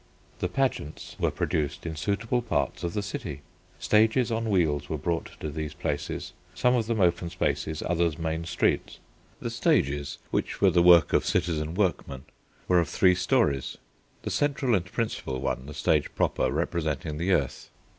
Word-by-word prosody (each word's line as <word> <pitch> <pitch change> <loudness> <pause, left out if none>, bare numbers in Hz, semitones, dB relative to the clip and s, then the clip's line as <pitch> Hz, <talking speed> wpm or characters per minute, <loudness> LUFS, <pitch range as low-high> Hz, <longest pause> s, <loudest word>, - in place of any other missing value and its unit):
The 90 - 0
pageants 130 - -2
were - - +2
produced 75 0 -2
in 80 -1 -4
suitable 105 +9 -1
parts 70 - -1
of 85 -1 -2
the 105 - -1
city. 80 -8 -6 0.3
Stages 110 +3 +3
on 115 0 -1
wheels 75 -7 +1
were 80 - -1
brought 85 +4 -3
to 75 - -3
these 75 0 -5
places, 75 -3 -3 0.2
some 125 +6 +3
of 115 -3 +1
them 115 -2 0
open 85 -1 +2
spaces, 80 -3 -2
others 85 -2 +1
main 80 0 -2
streets. - - 0 0.4
The - - -3
stages, 70 +1 +1
which - - -1
were - - +5
the 85 - +4
work 85 -1 +6
of - - +4
citizen 80 -1 -1
workmen, 85 -9 -1 0.4
were 90 -1 +5
of 85 - 0
three 90 -1 +4
storeys, 90 - +1 0.5
the - - -3
central 140 -4 +1
and 90 -4 +2
principal 95 - -3
one, 65 0 -3
the 75 - -7
stage - - +2
proper, - - +1
representing 75 -2 -2
the 90 +3 +2
earth. 70 -8 -1
85 Hz, 165 wpm, -27 LUFS, 75-100 Hz, 0.5 s, work